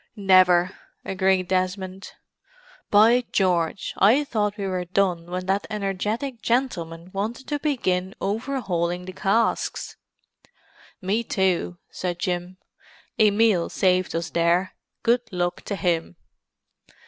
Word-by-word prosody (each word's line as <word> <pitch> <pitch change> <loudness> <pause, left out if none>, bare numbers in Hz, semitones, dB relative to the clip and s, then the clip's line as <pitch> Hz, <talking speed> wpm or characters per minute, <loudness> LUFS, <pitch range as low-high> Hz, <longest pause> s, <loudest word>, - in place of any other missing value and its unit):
"Never," 185 -3 +5 0.3
agreed 190 -1 +1
Desmond. 185 +1 -2 0.8
"By 230 +4 +5
George, 180 -2 0
I 235 +9 +5
thought 210 -6 -1
we 200 - -3
were 185 -2 -2
done 175 -2 0
when 180 +1 -4
that 195 +2 0
energetic 215 +5 -3
gentleman 180 -9 -2
wanted 220 +6 -4
to 295 -1 -1
begin 190 -11 -1
overhauling 195 -6 -2
the 185 - -7
casks." 200 +5 0 1.1
"Me 205 +5 0
too," 185 -4 0
said 180 -2 -3
Jim. 180 0 -3 0.6
"Emil 210 -4 +4
saved 185 -2 +1
us 165 0 -3
there—good 185 +7 0
luck 175 -1 -2
to 200 - -3
him!" 170 - -1
190 Hz, 110 wpm, -24 LUFS, 180-210 Hz, 1.1 s, Never